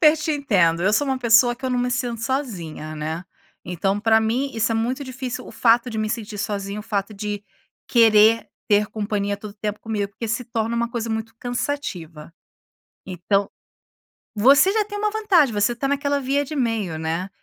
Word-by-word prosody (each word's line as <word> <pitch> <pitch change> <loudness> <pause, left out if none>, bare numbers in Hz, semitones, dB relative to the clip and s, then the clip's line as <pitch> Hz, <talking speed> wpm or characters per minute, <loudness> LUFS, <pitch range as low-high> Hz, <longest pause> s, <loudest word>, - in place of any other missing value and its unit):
super 310 -2 +6
te 310 0 -1
entendo. 180 - +2
Eu 210 - +3
sou 255 +7 +2
uma 265 -1 0
pessoa 240 0 +5
que 260 +2 -13
eu 260 - 0
não 250 - +1
me 250 0 0
sinto 245 -3 -2
sozinha, 185 - -4
né? 160 +3 -4 0.4
Então, 195 +3 -1
pra 220 0 +4
mim, 245 +5 0
isso 225 0 +1
é - - 0
muito 245 +5 -1
difícil, 255 -1 -6
o - - -10
fato 235 +1 +3
de 225 - -5
me 215 0 -1
sentir 215 -2 -4
sozinho, 200 0 -3
o - - -9
fato 205 0 -3
de 205 0 -4 0.5
querer 225 -1 +5 0.2
ter 210 -1 +4
companhia 205 -1 -2
todo 205 0 -10
tempo 210 0 -4
comigo, 210 -3 -2
porque 215 +3 -6
se 230 +3 -1
torna 230 0 -2
uma 235 0 -1
coisa 230 -1 -3
muito 220 0 -4
cansativa. 190 - -4 0.7
Então, 195 +2 0 0.9
você 280 - +6
já 435 -1 +2
tem 415 -1 -6
uma 425 0 0
vantagem, 390 - +3
você 205 +3 +2
tá 270 +3 -2
naquela 285 0 0
via 275 +2 0
de 305 +2 -7
meio, 225 - -1
né? 165 +4 -2
225 Hz, 195 wpm, -22 LUFS, 205-255 Hz, 0.9 s, super